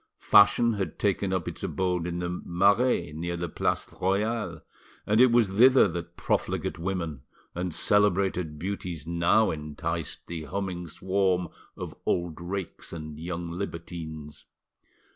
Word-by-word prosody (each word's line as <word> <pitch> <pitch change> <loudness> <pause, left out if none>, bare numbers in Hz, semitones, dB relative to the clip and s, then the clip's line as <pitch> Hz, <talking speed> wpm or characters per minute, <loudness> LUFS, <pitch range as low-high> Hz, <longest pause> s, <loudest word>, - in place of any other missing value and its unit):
Fashion 105 +3 +5
had 95 -7 -3
taken 100 -1 0
up 95 -3 -1
its - - -6
abode 90 -2 -1
in 85 0 -3
the 90 0 -3
Marais, 100 0 +2
near 85 +2 -3
the 85 +1 -2
Place 75 - -1 0.2
Royale, 95 -3 0 0.4
and 105 +3 +4
it 130 -1 +7
was 120 -2 +5
thither 125 +6 +6
that 85 0 -6
profligate - - -1
women 85 -6 -3 0.3
and 90 0 -3
celebrated 95 -4 +2
beauties 90 -3 -4
now 85 +6 +3
enticed 75 +1 -4
the 80 -2 -6
humming 90 +1 -4
swarm 95 0 0 0.3
of - - -6
old 85 -2 -1
rakes 95 +1 -5
and 75 -2 -7
young 85 0 -4
libertines. 85 -4 -6
90 Hz, 135 wpm, -27 LUFS, 85-100 Hz, 0.4 s, it